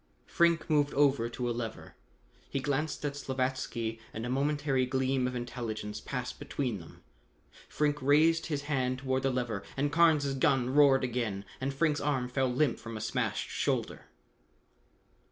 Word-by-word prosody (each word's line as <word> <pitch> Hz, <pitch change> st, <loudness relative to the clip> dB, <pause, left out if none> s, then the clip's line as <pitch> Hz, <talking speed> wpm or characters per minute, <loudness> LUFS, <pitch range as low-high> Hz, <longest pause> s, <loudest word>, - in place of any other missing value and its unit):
Frink 170 Hz, -1 st, +2 dB
moved 145 Hz, -2 st, +2 dB
over 135 Hz, -4 st, +3 dB
to 120 Hz, +1 st, -3 dB
a -, -, 0 dB
lever. 115 Hz, -2 st, -6 dB, 0.6 s
He 135 Hz, -, -1 dB
glanced 145 Hz, +3 st, -2 dB
at 140 Hz, -1 st, -2 dB
Slavatsky 130 Hz, -4 st, -2 dB, 0.2 s
and 110 Hz, +1 st, -3 dB
a 120 Hz, -, -2 dB
momentary 140 Hz, -1 st, +1 dB
gleam 130 Hz, 0 st, +1 dB
of 125 Hz, -, -4 dB
intelligence 115 Hz, -4 st, -4 dB
passed 125 Hz, -2 st, -5 dB
between 125 Hz, -8 st, -3 dB
them. 80 Hz, -, -14 dB, 0.7 s
Frink 150 Hz, -1 st, 0 dB
raised 155 Hz, +4 st, +4 dB
his 145 Hz, -4 st, -2 dB
hand 130 Hz, -3 st, 0 dB
toward 130 Hz, 0 st, -1 dB
the 135 Hz, -, +1 dB
lever 120 Hz, -5 st, -2 dB, 0.2 s
and 145 Hz, +1 st, +1 dB
Carnes 155 Hz, -4 st, +4 dB
gun 130 Hz, -1 st, +2 dB
roared 135 Hz, -2 st, +5 dB
again 115 Hz, -6 st, -2 dB, 0.2 s
and 135 Hz, +1 st, 0 dB
Frink's 150 Hz, +2 st, +1 dB
arm 130 Hz, -4 st, 0 dB
fell 130 Hz, 0 st, +1 dB
limp 130 Hz, +1 st, +1 dB
from 115 Hz, -1 st, -7 dB
a -, -, -5 dB
smashed 110 Hz, -, -2 dB
shoulder. -, -, -2 dB
130 Hz, 155 wpm, -30 LUFS, 125-145 Hz, 0.7 s, roared